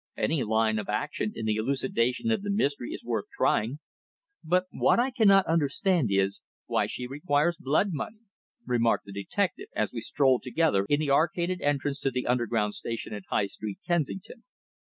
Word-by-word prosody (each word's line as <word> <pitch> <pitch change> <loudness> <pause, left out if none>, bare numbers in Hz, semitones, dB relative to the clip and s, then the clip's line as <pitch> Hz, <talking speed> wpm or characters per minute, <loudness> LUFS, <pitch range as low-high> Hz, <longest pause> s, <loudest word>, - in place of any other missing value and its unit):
Any 155 -5 +1
line 110 0 +1
of 105 - -6
action 105 0 -2
in 115 - -4
the 110 -1 +1
elucidation 130 - 0
of 220 -3 +1
the 205 - -5
mystery 145 - 0
is - - -7
worth 115 -4 -2
trying. 120 +7 +1 0.7
But 180 +3 +2
what - - +3
I 255 +2 +2
cannot 200 -6 +5
quite 165 - 0
understand 165 - +2
is, 95 0 +1 0.2
why - - +1
she 125 - -4
requires 145 +4 0
blood 155 +7 +2
money," 210 +9 -5 0.4
remarked 115 -2 +1
the 100 - -10
detective 195 - -2
as - - -1
we - - -4
strolled 130 -3 +2
together 125 -7 +1
in 145 +1 +3
the 145 -2 0
arcaded 170 +5 +1
entrance 145 0 0
to 135 - 0
the 125 -1 -3
Underground 115 -4 0
Station 115 -1 -5
at 105 -2 -7
High - - +1
Street, 100 0 -6
Kensington. 175 - -2
140 Hz, 180 wpm, -28 LUFS, 115-175 Hz, 0.7 s, cannot